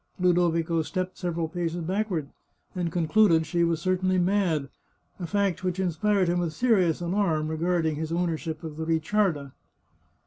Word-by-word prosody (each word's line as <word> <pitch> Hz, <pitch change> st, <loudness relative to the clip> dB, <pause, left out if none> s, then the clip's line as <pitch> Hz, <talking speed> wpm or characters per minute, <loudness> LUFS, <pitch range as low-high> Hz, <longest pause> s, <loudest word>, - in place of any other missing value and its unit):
Ludovico 170 Hz, -2 st, +2 dB
stepped 185 Hz, +3 st, -3 dB
several 170 Hz, -2 st, -2 dB
paces 170 Hz, 0 st, -3 dB
backward, 185 Hz, -4 st, -2 dB, 0.5 s
and 175 Hz, -2 st, -2 dB
concluded 165 Hz, 0 st, +3 dB
she 170 Hz, +3 st, 0 dB
was 165 Hz, -1 st, +1 dB
certainly 185 Hz, 0 st, +1 dB
mad, 180 Hz, -6 st, +1 dB, 0.5 s
a 175 Hz, -, -4 dB
fact 200 Hz, -2 st, 0 dB
which 185 Hz, 0 st, -1 dB
inspired 190 Hz, +2 st, +1 dB
him 175 Hz, +1 st, +1 dB
with 170 Hz, -3 st, -2 dB
serious 185 Hz, -8 st, +2 dB
alarm 170 Hz, -4 st, 0 dB
regarding 160 Hz, -1 st, 0 dB
his 160 Hz, +1 st, -4 dB
ownership 165 Hz, -2 st, -2 dB
of 155 Hz, -2 st, -7 dB
the 160 Hz, -, -3 dB
Ricciarda. 160 Hz, -3 st, 0 dB
175 Hz, 145 wpm, -26 LUFS, 160-185 Hz, 0.5 s, concluded